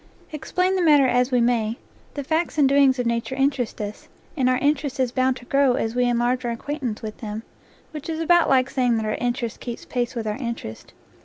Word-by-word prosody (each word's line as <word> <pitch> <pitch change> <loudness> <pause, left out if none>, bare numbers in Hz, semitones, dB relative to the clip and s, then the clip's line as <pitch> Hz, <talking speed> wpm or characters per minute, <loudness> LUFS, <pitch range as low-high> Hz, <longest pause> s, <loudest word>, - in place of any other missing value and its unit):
Explain 365 +5 -1
the 370 - +1
matter 295 -5 +5
as 250 0 +2
we 250 - +3
may, 235 -1 +1 0.4
the 285 - -3
facts 320 +3 -1
and 285 -3 +5
do 270 - +1
ings 275 -2 +5
of 245 - -1
nature 235 +2 -1
interest 270 -3 0
us, 210 0 -6 0.3
and 260 -4 +2
our 255 - +2
interest 285 -1 0
is 255 -2 +1
bound 255 0 +1
to 245 - -13
grow 275 0 +3
as 225 -2 -1
we 250 0 +2
enlarge 245 +1 +1
our 240 - -1
acquaintance 245 -1 -4
with 215 -1 -6
them, 215 0 -5 0.5
which 305 +1 -7
is 320 -1 -3
about 345 +1 +4
like 260 -1 +4
saying 250 -3 +2
that 220 - -2
our 215 - -1
interest 240 -1 -2
keeps 240 -2 -7
pace 245 0 -2
with 230 -2 -3
our 210 +1 -2
interest. 235 - -6
255 Hz, 225 wpm, -23 LUFS, 235-280 Hz, 0.5 s, matter